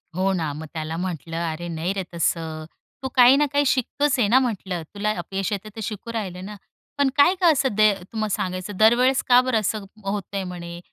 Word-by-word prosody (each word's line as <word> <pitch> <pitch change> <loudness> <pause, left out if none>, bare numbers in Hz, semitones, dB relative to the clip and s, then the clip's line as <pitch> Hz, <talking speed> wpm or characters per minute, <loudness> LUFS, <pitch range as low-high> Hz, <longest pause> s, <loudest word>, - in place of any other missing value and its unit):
हो 190 +1 +1
ना, 160 -5 -1
मग 155 +2 -7
त्याला 160 0 -4
म्हटलं, 165 -2 -4
"अरे, 175 +2 -6
नाही 170 +3 -2
रे 195 -1 -3
तसं. 160 -1 -1 0.4
तू - - -1
काही 250 +1 +8
ना 295 - +3
काही 285 0 +3
शिकतोच 270 +2 +1
आहे 210 - +3
ना?" 250 +5 +5
म्हटलं, 195 -8 -2
"तुला 210 +1 -1
अपयश 195 +3 -3
येतं 205 +1 -4
तर - - -7
शिकू 215 +2 -5
राहिलं 185 -4 -4
ना." 210 +1 -7 0.4
पण 280 -1 +3
काय 345 +6 +6
गं 345 -3 +6
असं 275 -2 +1
द 215 - +2 0.3
तुम्हा 215 -1 -2
सांगायचं 185 +1 -3
दरवेळेस 245 +4 +4
का 245 0 +7
बरं 255 -3 +1
असं 210 0 -2 0.2
होतंय? 195 -1 -3
म्हणे 175 -1 -7
200 Hz, 205 wpm, -23 LUFS, 175-245 Hz, 0.4 s, काही